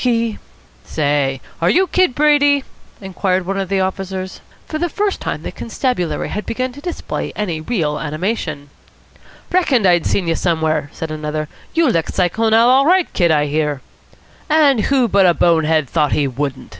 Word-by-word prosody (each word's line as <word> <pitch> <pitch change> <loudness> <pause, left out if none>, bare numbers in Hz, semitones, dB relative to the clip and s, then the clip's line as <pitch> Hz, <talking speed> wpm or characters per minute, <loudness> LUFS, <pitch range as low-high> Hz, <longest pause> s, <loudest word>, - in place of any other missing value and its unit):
He 230 -3 0 0.2
" - - -31
"Say, 145 -3 +1 0.2
are 170 - +3
you 375 +3 +4
Kid 365 -7 +1
Brady?" 290 -1 +4 0.4
inquired 190 -1 -1
one 195 +1 -2
of 190 -2 -3
the 195 -1 +1
officers. 190 0 -4 0.2
For 310 - -5
the 345 +1 0
first 410 +3 -2
time - - -4
the - - -5
constabulary 180 - -2
had 210 -1 -5
begun 255 +2 -2
to 285 +3 -12
display 350 +1 -4
any 175 -7 -3
real 155 -6 -1
animation. 155 -2 -3 0.8
"Reckoned 290 - +2
I'd 175 -3 +3
seen 185 -4 0
you 165 - +2
somewhere!" 160 -4 0
said 160 -1 -6
another. 155 0 -4 0.3
"You 330 -1 +3
licked 165 -10 0
Cyclone 220 +5 +2
Al. 230 +1 +5
all 265 +2 +5
right, 365 0 +3
Kid, 175 -3 +2
I 150 -2 +3
hear." 150 -1 -1 0.7
"And 290 -7 +4
who 265 -3 +2
but 195 -3 +4
a 175 - +3
bone 165 -2 +3
head 155 -2 +1
thought 150 0 +1
he 145 - +1
wouldn't?" 135 +1 -4
190 Hz, 180 wpm, -18 LUFS, 155-255 Hz, 0.8 s, Al